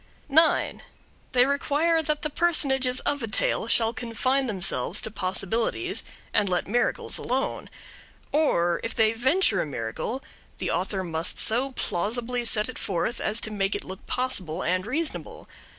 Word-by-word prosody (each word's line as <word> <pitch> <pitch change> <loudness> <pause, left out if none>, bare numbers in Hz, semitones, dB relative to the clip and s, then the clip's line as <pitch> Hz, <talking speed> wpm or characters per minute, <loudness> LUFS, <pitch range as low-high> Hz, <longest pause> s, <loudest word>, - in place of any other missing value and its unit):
9. 315 +3 +3 0.5
They 250 0 +6
require 295 +4 +2
that 300 -1 -1
the 305 - -2
personages 265 -7 +2
of 285 -1 0
a 225 - -2
tale 215 +1 0
shall 230 0 +2
confine 255 +3 0
themselves 195 -4 0
to 220 - -5
possibilities 225 - 0 0.3
and 205 -2 +3
let 180 -1 0
miracles 240 +5 0
alone; 260 +2 -2 0.6
or, 175 - +2
if 230 - -4
they 220 0 +3
venture 255 - +2
a - - -1
miracle, 140 - -4 0.3
the - - -2
author 190 +1 -1
must 165 -1 -2
so 250 +5 +2
plausibly 240 +6 -1
set 210 -2 +4
it 255 - -7
forth 190 +5 -2
as 215 +2 +1
to 220 - -2
make 195 -1 0
it - - -3
look 190 +1 -8
possible 190 -10 -1
and 185 +4 0
reasonable. 310 +6 -4
230 Hz, 150 wpm, -26 LUFS, 195-270 Hz, 0.6 s, They